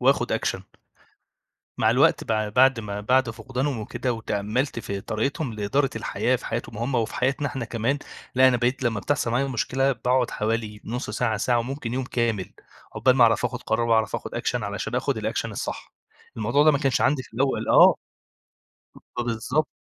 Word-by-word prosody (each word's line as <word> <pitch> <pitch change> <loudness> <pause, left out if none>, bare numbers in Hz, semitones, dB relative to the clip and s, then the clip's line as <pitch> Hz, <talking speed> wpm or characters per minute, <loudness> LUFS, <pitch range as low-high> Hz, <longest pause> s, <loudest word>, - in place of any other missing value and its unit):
وآخد - - +2
أكشن. - - -1 1.2
مع - - +4
الوقت - - +3
بع 110 -1 0
بعد 125 +2 +4
ما 100 -1 -5
بعد 125 +2 +2
فقدانهم 130 +3 -3
وكده، 125 +3 -2
وتأمَّلت 110 +4 -2
في 100 -3 -4
طريقتهم 125 - -2
لإدارة 130 +7 0
الحياة 130 +1 0
في - - -10
حياتهم 115 -1 -4
هم 125 +3 -2
وفي 115 -2 0
حياتنا 135 +3 0
احنا 135 -4 -4
كمان، 115 +5 -1 0.4
لأ 130 +1 +6
أنا 125 - +3
بقيت 125 +2 0
لما 115 -4 0
بتحصل 125 -1 0
معايا 130 +4 +1
مشكلة 135 +2 0
باقعد 125 +1 +1
حوالي 110 -1 -2
نص 120 0 -4
ساعة، 110 0 0
ساعة 120 +3 +1
وممكن 125 0 -4
يوم 130 0 -1
كامل، 115 -6 -1 0.5
عقبال 130 0 +3
ما 125 - +6
أعرف 115 +1 +3
آخد 125 0 -2
قرار 115 +1 0
وأعرف 110 -1 +2
آخد - - -8
أكشن - - -1
علشان - - -4
آخد - - 0
الأكشن - - -2
الصح، - - -5 0.4
الموضوع 120 +7 +2
ده 155 - +7
ما 140 - +1
كانش 135 -3 +1
عندي 135 -2 +2
في - - -16
الأول 135 +2 0
آه، - - +7 1.2
فبالضبط 120 +5 0
120 Hz, 175 wpm, -25 LUFS, 110-130 Hz, 1.2 s, ده